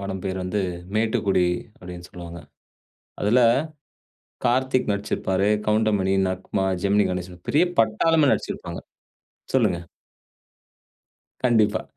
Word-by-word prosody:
படம் 95 -1 -5
பேரு 95 -1 -2
வந்து 100 +3 -1 0.3
"மேட்டுக்குடி", 105 -4 +2 0.3
அப்பிடீன்னு 90 0 -10
சொல்லுவாங்க. 85 -1 -9 0.8
அதுல 110 +5 +4 1.0
கார்த்திக் 130 -1 +1
நடிச்சிருப்பாரு, 100 -1 -1 0.2
கவுண்டமணி, 105 -3 +2
நக்மா, 95 +1 -2 0.2
ஜெமினி 100 +1 +3
கணேஷன், 90 -1 -6
பெரிய 155 +5 +4 0.2
பட்டாளமே 140 +7 +3
நடிச்சிருப்பாங்க. - - -4 0.8
சொல்லுங்க. 85 - +2 1.6
கண்டிப்பா 110 -4 +3
100 Hz, 90 wpm, -24 LUFS, 95-110 Hz, 1.6 s, அதுல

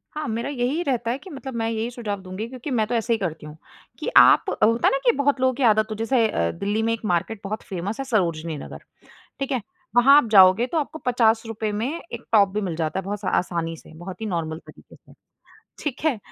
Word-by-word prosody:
हाँ, 305 0 -3
मेरा 230 +3 -3
यही 275 +4 -1
रहता 240 -6 -1
है 250 - -2
कि 375 - -13
मतलब 270 -4 -7
मैं 225 -1 -1
यही 225 +1 -2
सुझाव 210 -5 -5
दूँगी 185 +4 -6
क्योंकि 255 +3 -7
मैं 225 -4 +2
तो 245 - -1
ऐसे 230 +1 +1
ही - - +1
करती 165 -5 -4
हूँ, 150 0 -10 0.4
कि - - -5
आप - - +7
होता 230 +2 +4
है - - +4
ना - - +2
कि 240 - +6
बहुत 280 -1 +1
लोगों 260 0 +3
की 265 +2 -3
आदत 215 -2 +4
हो - - -2
जैसे 225 +1 +2
अ, 85 - 0
दिल्ली 205 - -2
में 225 - +1
एक 230 -1 -6
मार्केट 200 +5 -1
बहुत 210 +2 -5
फेमस 195 +4 -4
है 270 - -3
सरोजिनी 170 - -1
नगर, - - -9 0.6
ठीक 275 0 -3
है? 255 -3 0 0.3
वहाँ 255 +4 +7
आप 295 - +4
जाओगे 190 +2 +7
तो 325 - -2
आपको 315 +1 -3
₹50 225 -3 +1
में 230 - -1 0.3
एक - - -7
टॉप 205 -3 +5
भी 210 - -1
मिल 180 -5 -3
जाता 160 +2 -2
है - - -6
बहुत 205 +1 -3
सा 185 - -1
आसानी 170 -2 -3
से, 160 - -16
बहुत 180 +5 -9
ही - - -3
नॉर्मल 165 -5 -3
तरीके - - -16
से, - - -21 0.7
ठीक 280 -4 -3
है? 295 -8 +2
225 Hz, 245 wpm, -23 LUFS, 190-250 Hz, 0.7 s, आप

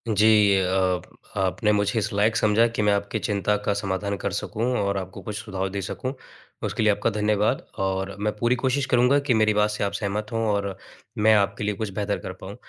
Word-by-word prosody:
जी, 105 -1 +5
अ 95 -1 +1 0.4
आपने 95 +3 +1
मुझे 105 +2 +1
इस 110 +2 -2
लायक 105 +3 +2
समझा 110 +1 +4
कि 105 - 0
मैं 105 -1 +3
आपकी 100 +2 -1
चिंता 105 0 0
का 100 - +2
समाधान 100 0 -2
कर - - -3
सकूँ 115 - -2
और 100 0 0
आपको 95 +1 -6
कुछ 105 +2 -6
सुझाव 95 -3 -3
दे 100 +1 -4
सकूँ। 130 +7 -4 0.5
उसके - - -1
लिए 105 - +5
आपका 100 - 0
धन्यवाद 105 -1 +1 0.2
और 95 0 -1
मैं 105 0 0
पूरी 120 +3 +2
कोशिश 130 +2 0
करूँगा 125 +3 +4
कि 125 - +4
मेरी 110 -1 +3
बात 105 0 +2
से 105 - -3
आप 100 - 0
सहमत 105 +1 -3
हों 115 0 -1
और 100 -2 -2 0.4
मैं 110 +1 +5
आपके 100 0 +1
लिए 105 0 -1
कुछ 110 0 -3
बेहतर 100 0 -1
कर 95 - -6
पाऊँ। 100 +2 -8
105 Hz, 215 wpm, -24 LUFS, 100-110 Hz, 0.5 s, जी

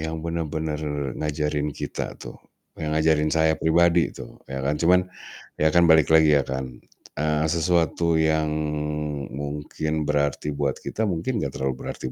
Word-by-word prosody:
yang 80 0 -4
benar-benar 80 -2 -3 0.4
ngajarin 75 -1 -1
kita 70 - -5
tuh. - - -9 0.5
Yang 75 -1 -2
ngajarin 75 -1 +2
saya 80 0 +3
pribadi 85 +1 +3
tuh - - -11
ya 65 0 -4
kan. 75 +2 -1
Cuman, 90 +2 +4 0.5
ya 80 +1 +2
kan 85 +1 +5
balik 80 -1 +5
lagi 80 -2 +6
ya 70 - +3
kan. 65 -1 -5 0.4
Eee, 75 0 0
sesuatu 85 -1 +1
yang 80 -1 +2 0.8
mungkin 75 +2 -3
berarti 75 0 0
buat 70 -1 -1
kita, 110 -1 -2
mungkin 95 +7 -1
nggak 70 - -3
terlalu 65 -1 -3
berarti 65 - -5
80 Hz, 150 wpm, -24 LUFS, 75-80 Hz, 0.8 s, lagi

